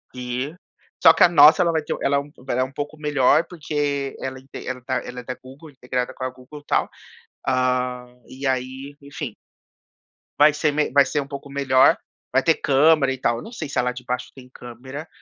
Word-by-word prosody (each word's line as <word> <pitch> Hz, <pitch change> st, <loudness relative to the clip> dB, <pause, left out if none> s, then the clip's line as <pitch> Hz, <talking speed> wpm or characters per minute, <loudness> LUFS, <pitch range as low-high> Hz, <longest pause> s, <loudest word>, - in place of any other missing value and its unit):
E, 125 Hz, +4 st, -4 dB, 0.5 s
só 165 Hz, -, +8 dB
que 165 Hz, -, +4 dB
a -, -, +7 dB
nossa, 155 Hz, +2 st, +7 dB
ela 170 Hz, -1 st, +3 dB
vai 160 Hz, -1 st, -1 dB
ter -, -, -3 dB
ela 140 Hz, 0 st, +2 dB
é -, -, +2 dB
um 145 Hz, +1 st, -9 dB
pouco 135 Hz, -3 st, -9 dB
ela 125 Hz, -, +1 dB
é -, -, +3 dB
um 130 Hz, -, -5 dB
pouco 145 Hz, +2 st, -6 dB
melhor, 150 Hz, +1 st, +3 dB
porque 145 Hz, -4 st, -2 dB
ela 130 Hz, 0 st, -5 dB
ente 135 Hz, +1 st, -10 dB
ela 130 Hz, 0 st, -4 dB
tá 130 Hz, 0 st, -2 dB
ela 125 Hz, 0 st, -8 dB
é -, -, -17 dB
da 125 Hz, +1 st, -5 dB
Google, 135 Hz, +6 st, -14 dB
integrada 125 Hz, -1 st, -3 dB
com 130 Hz, -, -8 dB
a 130 Hz, -, -1 dB
Google 130 Hz, +4 st, -13 dB
e -, -, -33 dB
tal. -, -, +1 dB, 0.6 s
Hã, 125 Hz, -1 st, -1 dB
e 135 Hz, +2 st, -8 dB
aí, 130 Hz, +2 st, -3 dB
enfim 140 Hz, -4 st, -7 dB, 1.1 s
vai 150 Hz, +1 st, +7 dB
ser 150 Hz, 0 st, +1 dB
me 150 Hz, -1 st, 0 dB
vai 140 Hz, +1 st, +5 dB
ser 145 Hz, +3 st, -1 dB
um 140 Hz, -, -8 dB
pouco 140 Hz, 0 st, -8 dB
melhor. 135 Hz, -2 st, +4 dB, 0.4 s
Vai 135 Hz, +1 st, +3 dB
ter 165 Hz, -, +4 dB
câmera 140 Hz, 0 st, +3 dB
e -, -, -6 dB
tal. 120 Hz, -2 st, +1 dB
Eu -, -, -7 dB
não -, -, -10 dB
sei 175 Hz, -10 st, -6 dB
se 140 Hz, -, -5 dB
a -, -, +2 dB
de -, -, -3 dB
lá 125 Hz, -, +1 dB
de 125 Hz, 0 st, -10 dB
baixo 125 Hz, 0 st, -3 dB
tem 130 Hz, -2 st, -14 dB
câmera. 130 Hz, +5 st, -9 dB
135 Hz, 235 wpm, -22 LUFS, 125-145 Hz, 1.1 s, só